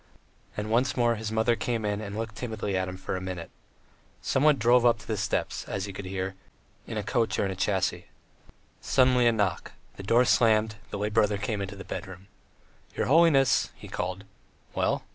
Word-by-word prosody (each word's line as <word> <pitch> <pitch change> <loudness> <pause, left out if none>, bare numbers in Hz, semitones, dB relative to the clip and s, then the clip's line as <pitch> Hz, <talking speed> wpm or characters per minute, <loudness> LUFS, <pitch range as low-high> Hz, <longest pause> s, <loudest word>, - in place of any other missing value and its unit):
And 105 +1 -3
once 125 +4 +2
more 120 -1 +3
his 110 -1 -4
mother 110 +2 +2
came 115 0 -2
in 105 0 -1
and 100 0 -6
looked 110 -1 -4
timidly 110 -5 -3
at 95 0 0
him 90 0 -6
for 95 - -4
a 90 - -4
minute. 90 -2 -6 0.7
Someone 145 +2 +3
drove 120 +1 +4
up 120 -1 +4
to 110 - -15
the - - -1
steps, - - -2
as 95 0 -3
he 100 - -7
could 95 +1 -7
hear, 95 0 -3 0.5
in 110 - -4
a 105 - -2
coach 115 +3 0
or - - +1
in 95 - -2
a 95 - -7
chaise. 95 -1 0 0.8
Suddenly 125 -2 +4
a - - +6
knock, 105 -5 -1 0.2
the - - -6
door 115 +5 +4
slammed, 110 -2 +3
the - - -4
lay 105 +1 -1
brother 105 -1 +2
came 105 0 -2
into 100 +1 -5
the 95 - -8
bedroom. 95 0 -7 0.7
"Your - - 0
holiness," 140 -3 +4
he - - -12
called. 95 +2 -4 0.5
"Well?" - - 0
105 Hz, 200 wpm, -27 LUFS, 95-120 Hz, 0.8 s, a